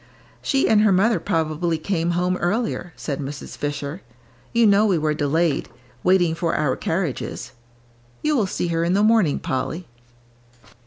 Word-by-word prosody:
"She 270 Hz, -2 st, +1 dB
and 215 Hz, -1 st, +5 dB
her 215 Hz, -1 st, +4 dB
mother 210 Hz, +5 st, +3 dB
probably 165 Hz, -2 st, -1 dB
came 170 Hz, 0 st, -1 dB
home 180 Hz, +1 st, +1 dB
earlier," 190 Hz, -1 st, -1 dB
said 140 Hz, -3 st, -4 dB
Mrs. 145 Hz, 0 st, -6 dB
Fisher; 145 Hz, +3 st, -4 dB, 0.5 s
"you 235 Hz, 0 st, +4 dB
know 205 Hz, 0 st, +5 dB
we 190 Hz, -4 st, +2 dB
were 155 Hz, -1 st, 0 dB
delayed, 155 Hz, +2 st, 0 dB, 0.3 s
waiting 180 Hz, -3 st, +3 dB
for 165 Hz, 0 st, -1 dB
our 145 Hz, -4 st, +1 dB
carriages. 165 Hz, -5 st, -3 dB, 0.7 s
You 305 Hz, 0 st, +2 dB
will 220 Hz, -7 st, +2 dB
see 175 Hz, -, -2 dB
her 165 Hz, 0 st, 0 dB
in 170 Hz, +2 st, +1 dB
the 200 Hz, +2 st, +3 dB
morning, 215 Hz, -9 st, +3 dB
Polly." 135 Hz, +7 st, -3 dB
175 Hz, 155 wpm, -22 LUFS, 155-200 Hz, 0.7 s, and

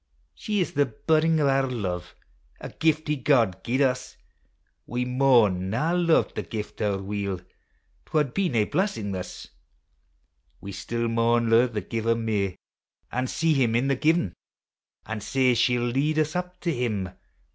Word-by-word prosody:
She 210 Hz, -2 st, -2 dB
is 175 Hz, -, -2 dB
the 145 Hz, -1 st, +2 dB
buddin' 160 Hz, +7 st, +2 dB
o' 145 Hz, -, +3 dB
our 135 Hz, -1 st, +2 dB
hive, 95 Hz, -8 st, -4 dB, 0.4 s
A -, -, -7 dB
giftie 155 Hz, -3 st, 0 dB
God 115 Hz, -, +2 dB
gied 130 Hz, +4 st, 0 dB
us: 130 Hz, -1 st, 0 dB, 0.7 s
We 125 Hz, +1 st, -2 dB
maun 120 Hz, -8 st, +3 dB
mi 110 Hz, -, -1 dB
luve 165 Hz, +3 st, +2 dB
the -, -, -3 dB
gift 110 Hz, 0 st, -6 dB
owre 100 Hz, -2 st, 0 dB
weel, 100 Hz, -1 st, -3 dB
'T 90 Hz, -, -19 dB, 0.7 s
wad 150 Hz, -5 st, +1 dB
be 195 Hz, -2 st, +1 dB
nae 115 Hz, -6 st, +2 dB
blessing 115 Hz, -, -1 dB
thus. 95 Hz, -1 st, -6 dB, 1.1 s
We 100 Hz, -, -8 dB
still 115 Hz, +5 st, -3 dB
maun 115 Hz, 0 st, +2 dB
lo'e 115 Hz, +2 st, +6 dB
the 110 Hz, -4 st, -4 dB
Giver 115 Hz, +3 st, -1 dB
mair 105 Hz, -5 st, -1 dB, 0.6 s
An' 125 Hz, +1 st, -1 dB
see 165 Hz, +4 st, +1 dB
Him 120 Hz, -5 st, +2 dB
in 130 Hz, +4 st, +1 dB
the 135 Hz, -, +2 dB
given; 155 Hz, -, +1 dB, 0.7 s
An' 110 Hz, -1 st, -5 dB
sae 130 Hz, +3 st, +2 dB
she 120 Hz, +1 st, +2 dB
'11 120 Hz, 0 st, -1 dB
lead 150 Hz, +4 st, +1 dB
us 155 Hz, +2 st, +1 dB
up 180 Hz, 0 st, -4 dB
to 170 Hz, -2 st, 0 dB
Him. 110 Hz, -7 st, -2 dB
125 Hz, 165 wpm, -26 LUFS, 110-150 Hz, 1.1 s, lo'e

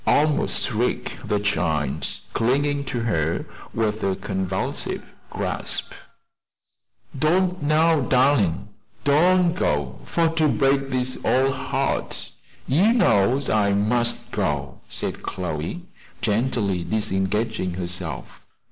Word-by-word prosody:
almost 150 Hz, 0 st, +3 dB
shrieked 120 Hz, -2 st, -2 dB
the 105 Hz, -1 st, +1 dB
child, 80 Hz, -8 st, 0 dB, 0.3 s
clinging 140 Hz, +4 st, +1 dB
to 125 Hz, -3 st, -3 dB
her 85 Hz, -8 st, 0 dB, 0.3 s
with 110 Hz, -1 st, -1 dB
a 95 Hz, -1 st, 0 dB
convulsive 95 Hz, 0 st, -3 dB, 0.3 s
grasp. -, -, -2 dB, 1.2 s
"Don't 180 Hz, +5 st, +1 dB
now, 155 Hz, +2 st, +3 dB
darlin'! 125 Hz, -, +2 dB, 0.4 s
don't 175 Hz, +4 st, +4 dB
go 75 Hz, -, -1 dB
for 170 Hz, -1 st, +1 dB
to 160 Hz, -1 st, +2 dB
break 135 Hz, -1 st, +2 dB
dis 130 Hz, -1 st, -1 dB
ole 135 Hz, +1 st, +3 dB
heart! -, -, -2 dB, 0.4 s
You 180 Hz, -, +4 dB
knows 125 Hz, -, +3 dB
I 100 Hz, -2 st, +2 dB
must 120 Hz, +4 st, +1 dB
go," -, -, -2 dB
said -, -, -3 dB
Chloe, 90 Hz, -, -4 dB, 0.4 s
gently 105 Hz, -5 st, 0 dB
disengaging 100 Hz, -1 st, -1 dB
herself. 90 Hz, -5 st, -5 dB
115 Hz, 105 wpm, -23 LUFS, 95-145 Hz, 1.2 s, don't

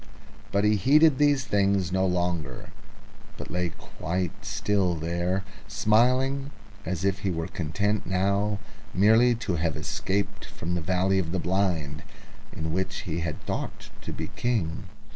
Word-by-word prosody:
But 100 Hz, 0 st, +2 dB
he 105 Hz, 0 st, +4 dB
heeded 145 Hz, -, +5 dB
these 145 Hz, -3 st, +3 dB
things 100 Hz, -3 st, +2 dB
no 95 Hz, +1 st, +2 dB
longer, 85 Hz, -7 st, -2 dB, 0.7 s
but -, -, -8 dB
lay 90 Hz, -1 st, 0 dB
quite 85 Hz, +2 st, -3 dB
inactive 100 Hz, -4 st, 0 dB
there, 85 Hz, +4 st, -1 dB, 0.2 s
smiling 130 Hz, +6 st, +2 dB, 0.4 s
as 90 Hz, +1 st, -2 dB
if 95 Hz, 0 st, +1 dB
he 100 Hz, -, -1 dB
were 80 Hz, -2 st, -2 dB
satisfied 100 Hz, +2 st, 0 dB, 0.4 s
merely 110 Hz, +5 st, +5 dB
to 100 Hz, -6 st, -2 dB
have 80 Hz, 0 st, 0 dB
escaped 100 Hz, +1 st, -2 dB
from 85 Hz, +2 st, -5 dB
the 90 Hz, -, -1 dB
valley 95 Hz, +3 st, +2 dB
of 85 Hz, -3 st, -2 dB
the 95 Hz, -, 0 dB
Blind 85 Hz, -5 st, 0 dB, 0.5 s
in 80 Hz, 0 st, -4 dB
which 95 Hz, +2 st, -1 dB
he 85 Hz, -4 st, -3 dB
had 85 Hz, -3 st, -4 dB
thought -, -, -4 dB
to -, -, -6 dB
be -, -, -5 dB
King. 105 Hz, -10 st, -1 dB
95 Hz, 145 wpm, -27 LUFS, 85-105 Hz, 0.7 s, heeded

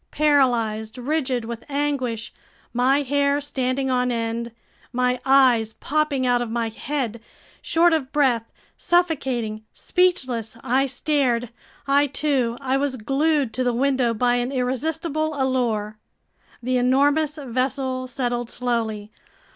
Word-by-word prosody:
Paralyzed, 240 Hz, -7 st, +1 dB
rigid 255 Hz, -2 st, -1 dB
with 235 Hz, 0 st, -6 dB
anguish, 275 Hz, -6 st, -2 dB, 0.4 s
my 265 Hz, +4 st, +3 dB
hair 285 Hz, +1 st, +1 dB
standing 265 Hz, -1 st, -1 dB
on 250 Hz, 0 st, +1 dB
end, 230 Hz, 0 st, -2 dB, 0.4 s
my 250 Hz, 0 st, +1 dB
eyes 250 Hz, -5 st, +4 dB
popping 295 Hz, -1 st, 0 dB
out 245 Hz, -1 st, +2 dB
of 240 Hz, -, -3 dB
my 230 Hz, 0 st, -1 dB
head, 235 Hz, -1 st, -3 dB, 0.4 s
short 335 Hz, +1 st, +3 dB
of 275 Hz, -5 st, -1 dB
breath, 250 Hz, -6 st, +1 dB, 0.3 s
suffocating, 265 Hz, -11 st, 0 dB
speechless, 260 Hz, -, 0 dB
I 265 Hz, +2 st, +2 dB
stared—I 270 Hz, +1 st, 0 dB
too! 265 Hz, -4 st, 0 dB
I 270 Hz, 0 st, 0 dB
was 275 Hz, -1 st, -1 dB
glued 275 Hz, +1 st, 0 dB
to 255 Hz, -, -1 dB
the 245 Hz, -1 st, +1 dB
window 260 Hz, -1 st, +1 dB
by 245 Hz, +2 st, +2 dB
an 245 Hz, +2 st, -1 dB
irresistible 310 Hz, +4 st, -1 dB
allure! 230 Hz, -5 st, -1 dB, 0.6 s
The 255 Hz, +1 st, +1 dB
enormous 285 Hz, +4 st, +2 dB
vessel 260 Hz, -1 st, -2 dB
settled 240 Hz, -1 st, -2 dB
slowly. 225 Hz, -4 st, -2 dB
255 Hz, 120 wpm, -23 LUFS, 235-280 Hz, 0.6 s, eyes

